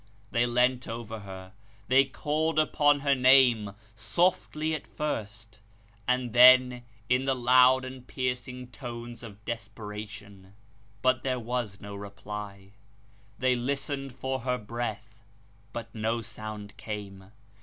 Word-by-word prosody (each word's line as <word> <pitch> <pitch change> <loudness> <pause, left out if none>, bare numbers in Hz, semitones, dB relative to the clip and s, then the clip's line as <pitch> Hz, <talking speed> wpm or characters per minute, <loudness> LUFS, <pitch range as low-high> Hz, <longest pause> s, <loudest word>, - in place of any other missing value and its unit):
They 120 +1 +2
leant 125 +1 +2
over 115 -1 -6
her; 95 -1 -10 0.3
they 135 +2 +5
called 155 +3 -1
upon 145 -2 +3
her 140 -1 +3
name, 125 -6 +5 0.2
softly 155 - +1
at 155 - -4
first, 110 -6 -5 0.5
and 125 -2 0
then 125 0 +7 0.3
in 125 +3 +2
the 135 -1 +2
loud 130 +1 +5
and 130 -1 -9
piercing 125 -1 -3
tones 120 -1 -7
of 105 -3 -12
desperation. 105 -3 -8 0.5
But 130 0 +3
there 130 -1 -1
was 120 -4 -3
no 100 0 -8
reply. 100 0 -8 0.7
They 130 +1 +2
listened 135 +1 -3
for 130 +1 -2
her 125 +1 -1
breath, 110 -1 -5 0.5
but 115 0 -7
no 115 +1 -1
sound 110 -2 -8
came. 100 -3 -7
120 Hz, 125 wpm, -28 LUFS, 105-130 Hz, 0.7 s, then